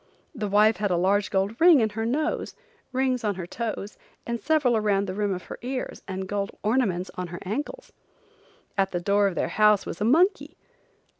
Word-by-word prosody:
The 215 -7 -3
wife 210 +2 +4
had 205 -1 -1
a 180 - +1
large 200 +3 +2
gold 195 +6 -1
ring 335 -4 +8
in 220 -2 +2
her 225 +2 -3
nose, 305 +6 -1 0.4
rings 255 -1 0
on 205 -2 0
her 180 -2 -5
toes 215 +1 -5 0.3
and 235 -1 -3
several 300 -6 +2
around 205 -2 +1
the 185 - -4
rim 205 0 -1
of 180 -1 -4
her - - -9
ears, 255 +1 -4
and 190 -1 -4
gold 200 0 -2
ornaments 210 -6 0
on 180 -1 -5
her 175 +1 -7
ankles. 295 - -5 0.9
At 195 0 +3
the 175 - 0
door 200 +3 +2
of 190 - -3
their - - -1
home 210 0 +5
was 170 - -7
a - - +2
monkey. 355 - +2
210 Hz, 200 wpm, -25 LUFS, 195-250 Hz, 0.9 s, ring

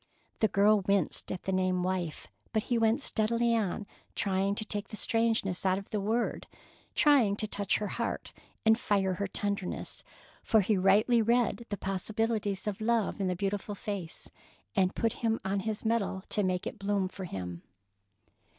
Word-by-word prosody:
The 220 - +4
girl 205 +1 +4
winced 195 -4 +1
at 185 - -4
the 190 - -1
name 185 -1 +1
"wife," 180 -4 -2 0.3
but 220 -1 +1
he 240 - 0
went 225 +4 +3
steadily 230 +1 +2
on 210 -2 -1 0.3
trying 195 0 +1
to 215 - -4
take 205 -1 -4
the 215 - -8
strangeness 225 -6 +1
out 190 -1 +3
of 195 - -8
the 210 - 0
word, 225 +4 -1 0.5
trying 265 -9 +5
to 215 - -2
touch 200 -2 0
her 210 - -3
heart - - -3 0.3
and 220 +1 +5
fire 195 -4 +1
her 200 +2 -2
tenderness; 200 -1 -3 0.4
for 220 - +4
he 205 +2 +2
rightly 205 +5 +4
read 235 +1 +1
the 205 - -2
possibilities 205 +1 -1
of 210 0 -3
love 225 -2 +1
in 190 - +1
the 180 - 0
beautiful 200 +2 -2
face, 195 -5 -4 0.4
and 190 -3 +4
it - - -19
put 230 -1 +1
him 225 -1 +1
on 195 +1 0
his 215 +2 -3
mettle 220 -4 0
to 210 - +2
make 185 -2 0
it - - -5
bloom 195 -1 0
for 190 0 -7
him. 90 - -5
205 Hz, 180 wpm, -30 LUFS, 190-220 Hz, 0.5 s, trying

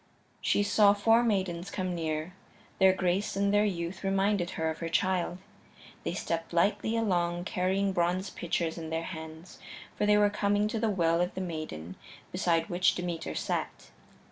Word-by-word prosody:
She 205 - +2
saw 205 0 +5
four 225 +3 +4
maidens 190 -5 -1
come 185 -3 -3
near; 160 0 -3 0.5
their 190 -1 +7
grace 185 +2 0
and 200 0 +1
their 205 +1 +4
youth 175 -2 -3
reminded 195 -1 +1
her 160 - 0
of 160 - -8
her 165 - -3
child. 180 0 0 0.7
They - - -2
stepped 165 0 -3
lightly 205 +6 +1
along, 175 -5 0
carrying 190 +2 0
bronze 180 +2 0
pitchers 170 -1 -2
in 160 -1 -6
their 160 +1 -2
hands, 160 +1 -9 0.4
for 210 - 0
they 210 0 +5
were 205 0 +4
coming 205 0 +1
to 225 - -2
the 225 0 +1
Well 170 -4 +2
of 180 +1 -1
the 190 - -3
Maiden 155 - -6 0.3
beside 170 -3 +1
which 175 +1 +2
Demeter 175 -2 -4
sat. - - -3
180 Hz, 170 wpm, -29 LUFS, 170-200 Hz, 0.7 s, their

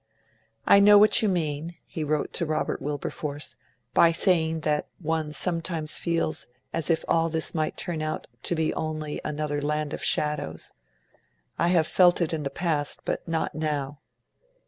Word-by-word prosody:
'I 200 - +7
know 205 +1 +8
what 210 +1 +6
you 215 - +2
mean,' 165 -2 -2
he 160 - -5
wrote 150 0 -1
to 170 - 0
Robert 155 - -1
Wilberforce, 145 +1 -4 0.4
'by 165 - +6
saying 165 -2 +2
that 150 -1 0
one 160 -2 -2
sometimes 165 -1 0
feels 165 -2 -1 0.3
as 165 0 -2
if 165 -1 +1
all 165 0 +2
this 160 0 -1
might 155 -2 -1
turn 170 -4 -3
out 155 0 -3 0.2
to 170 - -1
be 160 -1 0
only 155 -1 -4
another 150 -1 -2
"Land 150 0 -1
of - - -5
Shadows". 145 - -1 0.9
I 170 - +3
have 175 -3 +3
felt 175 +1 +4
it 170 -2 0
in 155 -2 -2
time 140 -1 -4
past, 155 -5 0
but - - -3
not 165 -1 -1
now. 145 -2 -3
155 Hz, 165 wpm, -26 LUFS, 150-170 Hz, 0.9 s, know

